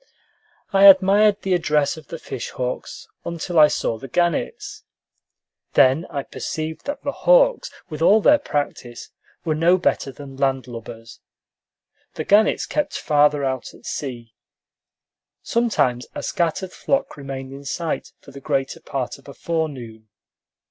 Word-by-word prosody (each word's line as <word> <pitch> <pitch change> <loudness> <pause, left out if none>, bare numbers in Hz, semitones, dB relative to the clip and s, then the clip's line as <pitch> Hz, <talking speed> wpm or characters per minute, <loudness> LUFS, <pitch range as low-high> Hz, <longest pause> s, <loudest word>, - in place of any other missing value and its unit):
I 195 0 +6
admired 200 +2 +6
the 190 - +1
address 150 -4 +1
of 160 -1 -13
the 165 - -6
fish 130 -6 -6
hawks 125 0 -5 0.2
until 170 0 -1
I 150 - +9
saw 115 -6 -2
the 135 - -8
gannets. 175 +4 -1 0.9
Then 135 +6 +4
I 140 -2 -3
perceived 155 +3 -5
that 285 0 -4
the 280 - -1
hawks, - - +3 0.2
with 155 -1 -7
all 205 +6 +6
their 295 +7 +5
practice, 145 - -4 0.3
were 160 - +1
no 170 +4 +4
better 160 -6 0
than 135 -1 -11
landlubbers. 120 -4 -4 1.0
The - - -3
gannets 210 +2 +3
kept 300 - -2
farther 145 -1 +2
out 130 -2 -4
at - - -18
sea. 120 -5 -6 1.1
Sometimes 205 - 0
a - - -5
scattered 175 +2 -1
flock 275 0 -1
remained 135 -2 -7
in 140 +1 -10
sight 160 +3 -3
for 140 - -14
the 140 0 -11
greater 135 -2 -2
part 135 0 -4
of 135 - -20
a 140 - -10
forenoon. 130 -10 -4
150 Hz, 140 wpm, -22 LUFS, 135-185 Hz, 1.1 s, I